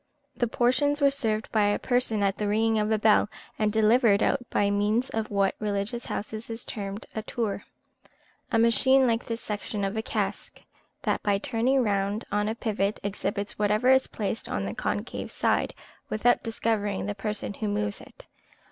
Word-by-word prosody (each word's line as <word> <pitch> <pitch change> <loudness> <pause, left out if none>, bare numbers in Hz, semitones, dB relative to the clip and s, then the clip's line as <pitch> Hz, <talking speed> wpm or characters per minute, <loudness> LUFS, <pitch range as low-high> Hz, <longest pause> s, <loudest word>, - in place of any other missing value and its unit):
The 240 - +1
portions 255 +5 +2
were 280 -1 +5
served 220 -6 -1
by 215 -2 +3
a 205 0 +2
person 245 -4 0
at 195 -1 +2
the 210 - 0
ringing 220 +1 +2
of 210 0 0
a 220 - +3
bell, 210 -1 +4 0.3
and 215 -1 +2
delivered 220 0 +4
out 275 - +2
by 200 0 +2
means 210 +5 +1
of 220 -1 -2
what 200 -1 +2
in 215 - -3
religious 205 +4 -2
houses 215 +2 -5
is 225 +1 -6
termed 200 -1 -5
a 220 - -3
tour 215 -2 -3 0.9
a 230 - +3
machine 245 +4 +5
like 230 -1 0
the 230 - -2
section 210 -2 -4
of 195 +2 -1
a 220 - 0
cask, - - -3 0.4
that, - - 0
by 200 -1 +2
turning 250 +3 +1
round 200 0 0
on 210 +1 +1
a 220 - -2
pivot, 210 -3 -1
exhibits 200 0 -3
whatever 210 +4 +2
is 265 0 +4
placed 215 +1 -4
on - - -2
the - - -3
concave - - -3
side, - - 0 0.3
without 235 +3 +2
discovering 220 -4 -1
the 205 - -2
person 210 0 -4
who 215 - -4
moves 205 0 -2
it. - - -15
215 Hz, 185 wpm, -27 LUFS, 205-230 Hz, 0.9 s, were